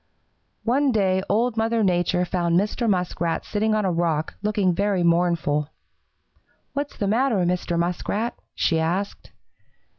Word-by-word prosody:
"One 270 +4 +2
day 190 -4 +2
Old 230 +3 +1
Mother 225 0 +1
Nature 180 -1 +1
found 175 -1 +1
Mr. 215 +3 -1
Muskrat 175 -3 -1
sitting 215 +1 0
on 215 -2 +1
a 185 - +1
rock, 165 -2 0
looking 205 -3 +1
very 195 0 +1
mournful. 170 -4 +2 1.1
"'What's 285 0 -4
the 205 - -1
matter, 225 -3 +2
Mr. 175 -1 -1
Muskrat?' 180 +6 -1 0.2
she 165 - +1
asked. 180 +5 -2
190 Hz, 130 wpm, -23 LUFS, 175-215 Hz, 1.1 s, One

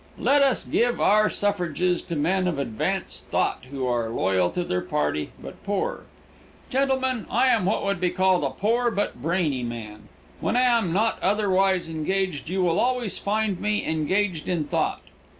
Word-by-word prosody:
Let 285 0 +3
us 270 -3 +2
give 240 +1 +1
our 215 +1 +4
suffrages 180 -3 0
to 170 - -3
men 180 +5 +1
of 170 -5 -1
advanced 115 -6 -2
thought - - 0
who 135 -1 -3
are 120 -2 0
loyal 95 -4 +1
to 180 - -2
their 90 - -1
party 75 0 -1
but - - -11
poor. 200 -1 -2 0.7
Gentlemen, 260 -3 0
I 255 +4 +3
am 225 -7 +3
what 200 +1 0
would 200 -2 0
be 180 - +2
called 185 0 +2
a - - +1
poor 235 +4 +1
but 200 - -2
brainy 160 -4 0
man. 110 -3 -7 0.3
When - - 0
I 250 - +4 0.2
am 185 -7 -2
not 220 +5 +1
otherwise 195 -2 +2
engaged 165 0 -2
you 185 +1 0
will 170 -2 +2
always 245 -6 0
find 210 -2 -1
me 210 0 0
engaged 165 +2 0
in 175 -4 0
thought. - - -1
185 Hz, 170 wpm, -25 LUFS, 155-210 Hz, 0.7 s, our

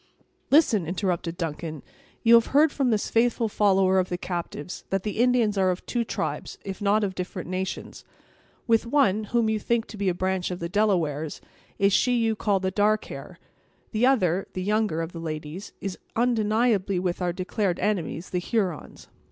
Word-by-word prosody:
"Listen," 235 - +4
interrupted 175 -2 -2
Duncan; 155 -3 -4 0.4
"you 230 0 +6
have 230 -1 +6
heard 305 0 +6
from 270 -3 0
this 215 -3 0
faithful 230 0 +2
follower 195 -3 +3
of 185 - 0
the 175 - -2
captives, 175 -2 -5
that 195 -1 -1
the 210 0 -3
Indians 235 -4 +3
are 190 -1 +3
of 180 0 -3
two 240 -1 -1
tribes, - - -4
if 195 +1 -6
not 210 +1 +3
of 195 -2 -1
different 180 -1 -5
nations. 185 +1 -4 0.6
With 230 -1 +2
one, 220 -6 +2
whom 235 +1 +1
you 220 0 0
think 235 +1 0
to 215 - -9
be 200 -2 +1
a 175 - -1
branch 185 0 -1
of 180 - -4
the 170 -1 -4
Delawares, 170 -7 0 0.4
is 200 0 +3
she 250 +4 +3
you 225 -1 +1
call 205 -2 +1
the 190 0 -1
'dark 210 +2 +2
hair'; - - -9 0.5
the 230 +3 +3
other, 190 -8 +2
and 185 0 -3
younger, 210 -6 +1
of 165 - -6
the 170 - -8
ladies, 155 +3 -6
is 195 -2 -5 0.2
undeniably 220 -4 +2
with 180 0 -2
our 175 -1 +1
declared 185 +1 -1
enemies, 185 -4 -2
the 180 - 0
Hurons. 185 - -3
195 Hz, 185 wpm, -26 LUFS, 180-220 Hz, 0.6 s, you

